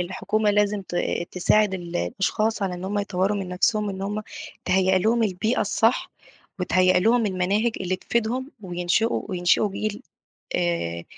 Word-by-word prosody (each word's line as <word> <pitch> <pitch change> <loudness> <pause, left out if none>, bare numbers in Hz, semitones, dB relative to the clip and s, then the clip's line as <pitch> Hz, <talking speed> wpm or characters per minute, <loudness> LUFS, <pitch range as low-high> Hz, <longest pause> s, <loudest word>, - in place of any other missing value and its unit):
الحكومة 210 +4 0
لازم 205 -1 +1
ت 175 - -6 0.3
تساعد 195 +2 +2
ال 175 -2 -5
الأشخاص 200 - -1
على 185 -2 -1
إن 180 +1 -7
هم 205 +2 -1
يطوّروا 200 +1 0
من 190 -2 -4
نفسهم 210 +3 +1
إن 190 0 -6
هم 210 +2 -3 0.4
تهيّأ 190 0 +3
لهم 230 +5 +2
البيئة 215 +3 0
الصح، 225 +4 +1 0.5
وتهيّأ 185 0 +3
لهم 225 +3 +3
المناهج 200 +5 +1
اللي 185 0 -1
تفيدهم 235 +6 -2
وينشِئوا 180 +5 0
وينشِئوا 180 +3 +2
جيل 215 +4 -4 0.5
آآ 85 - -1
195 Hz, 145 wpm, -24 LUFS, 180-215 Hz, 0.5 s, تهيّأ